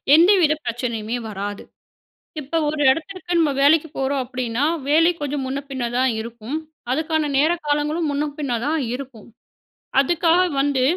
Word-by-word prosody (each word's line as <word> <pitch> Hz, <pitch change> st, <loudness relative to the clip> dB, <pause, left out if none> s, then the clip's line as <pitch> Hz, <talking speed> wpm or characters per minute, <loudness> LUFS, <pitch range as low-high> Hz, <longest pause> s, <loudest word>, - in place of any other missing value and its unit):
எந்தவித 340 Hz, -2 st, +5 dB
பிரச்சனையுமே 235 Hz, -1 st, -3 dB
வராது. 205 Hz, 0 st, -5 dB, 0.8 s
இப்ப 295 Hz, +4 st, -3 dB
ஒரு 300 Hz, -1 st, -2 dB
இடத்துக்கிட்ட, 350 Hz, +5 st, -2 dB
நம்ம 305 Hz, -3 st, +3 dB
வேலைக்கு 310 Hz, +3 st, +4 dB
போறோம் 270 Hz, 0 st, 0 dB
அப்பிடீன்னா, 250 Hz, 0 st, -3 dB, 0.3 s
வேலை 330 Hz, +3 st, +5 dB
கொஞ்சம் 285 Hz, -1 st, -2 dB
முன்ன 270 Hz, +2 st, -2 dB
பின்ன 260 Hz, -2 st, -4 dB
தான் 260 Hz, 0 st, +3 dB
இருக்கும். 235 Hz, +5 st, -6 dB, 0.3 s
அதுக்கான 315 Hz, +1 st, 0 dB
நேர, 310 Hz, +4 st, +4 dB, 0.2 s
காலங்களும் 300 Hz, +2 st, 0 dB
முன்ன 285 Hz, +1 st, 0 dB
பின்ன 275 Hz, -5 st, -2 dB
தான் 315 Hz, +1 st, 0 dB, 0.2 s
இருக்கும். 255 Hz, -5 st, -10 dB, 0.7 s
அதுக்காக 335 Hz, +4 st, +3 dB, 0.2 s
வந்து 275 Hz, -2 st, +1 dB
285 Hz, 135 wpm, -21 LUFS, 255-315 Hz, 0.8 s, எந்தவித